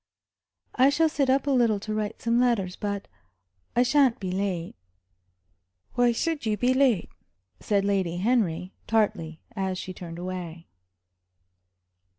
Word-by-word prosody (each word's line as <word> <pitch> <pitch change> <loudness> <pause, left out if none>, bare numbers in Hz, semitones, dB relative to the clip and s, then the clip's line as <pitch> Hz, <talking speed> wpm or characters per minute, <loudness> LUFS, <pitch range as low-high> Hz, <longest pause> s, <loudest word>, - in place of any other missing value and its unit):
"I 260 +2 +5
shall 315 +3 +3
sit 275 -3 0
up 270 +1 +3
a 285 - +1
little 235 -5 +3
to 215 +1 -4
write 215 0 -3
some 235 +1 +2
letters. 215 -7 +1
But 200 -1 -4 0.7
I 245 - +5
sha'n't 265 -1 +3
be 185 -2 -3
late." 185 -3 -2 1.2
"Why 245 0 +3
should 310 +5 -1
you 215 -2 0
be 250 +3 +2
late?" 260 -7 +2 0.5
said 200 -2 0
Lady 190 -4 0
Henry, 185 -4 0
tartly, 205 -8 0
as 190 -2 -2
she 185 - -6
turned 170 -2 -8
away. 175 -2 -6
210 Hz, 140 wpm, -26 LUFS, 185-245 Hz, 1.2 s, I